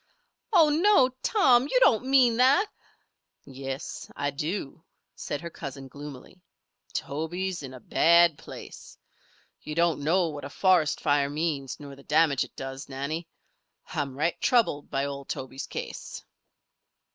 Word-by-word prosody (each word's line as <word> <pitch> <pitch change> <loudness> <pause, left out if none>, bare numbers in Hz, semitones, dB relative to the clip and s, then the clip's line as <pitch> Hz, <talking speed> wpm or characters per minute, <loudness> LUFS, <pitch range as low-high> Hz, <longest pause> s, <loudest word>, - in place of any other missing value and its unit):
"Oh 335 -7 +6
no, 315 -3 +4
Tom! 260 - +4
You - - +3
don't 245 - +4
mean 255 -4 +5
that?" 270 - +5 0.8
"Yes, 135 +1 -6
I 145 0 -1
do," 150 +1 -4 0.3
said 145 - -5
her 170 - -7
cousin, 135 -3 -8
gloomily. 145 +5 -11 0.5
"Tobe's 175 +5 -3
in 135 -2 -7
a - - -10
bad 170 +6 +4
place. - - -11 0.6
You 150 - -6
don't 170 -2 +2
know 170 +4 +2
what 145 -2 -7
a 140 - -6
forest 180 -2 +2
fire 145 -2 +2
means, 145 -3 -3
nor 140 -2 -9
the 135 - -15
damage 150 -2 +3
it - - -13
does, 135 +1 -7
Nannie. 140 +5 -4 0.7
I'm 140 -2 -3
right 165 +4 -1
troubled 225 - +2
by 135 +1 -1
old 140 -1 -6
Tobe's 130 +1 -5
case." - - -7
150 Hz, 140 wpm, -27 LUFS, 140-185 Hz, 0.8 s, Oh